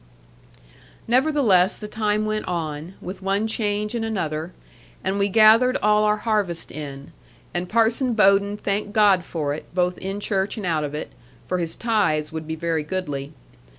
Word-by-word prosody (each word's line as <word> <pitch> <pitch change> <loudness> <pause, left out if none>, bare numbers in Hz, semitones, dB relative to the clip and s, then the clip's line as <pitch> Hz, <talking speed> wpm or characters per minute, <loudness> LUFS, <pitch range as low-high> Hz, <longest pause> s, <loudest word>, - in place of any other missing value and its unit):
Nevertheless 240 -7 +3
the 210 - -7
time 215 0 0
went 215 0 -2
on, 165 0 -4
with 185 +3 -7
one 195 +3 0
change 210 -1 -1
and 235 -2 -2
another; 165 -7 -3 0.5
and 195 +1 -1
we 200 0 +2
gathered 225 +4 +6
all 210 0 +3
our 210 0 +3
harvest 210 -6 -1
in; 140 -2 -8 0.4
and 175 0 -3
Parson 230 +3 +2
Bowden 200 0 +4
thanked 205 0 -2
God 205 -5 +4
for 150 -4 -3
it, 150 - -7
both 180 0 +1
in 195 +2 -4
church 200 +1 -1
and 210 - -4
out 160 -3 0
of 145 0 -4
it; 150 - -5 0.4
for 180 - -1
his 165 -2 -2
tithes 200 -10 0
would 160 -1 -6
be 160 - -3
very 165 0 -1
goodly. 150 -4 -4
195 Hz, 165 wpm, -23 LUFS, 165-215 Hz, 0.5 s, gathered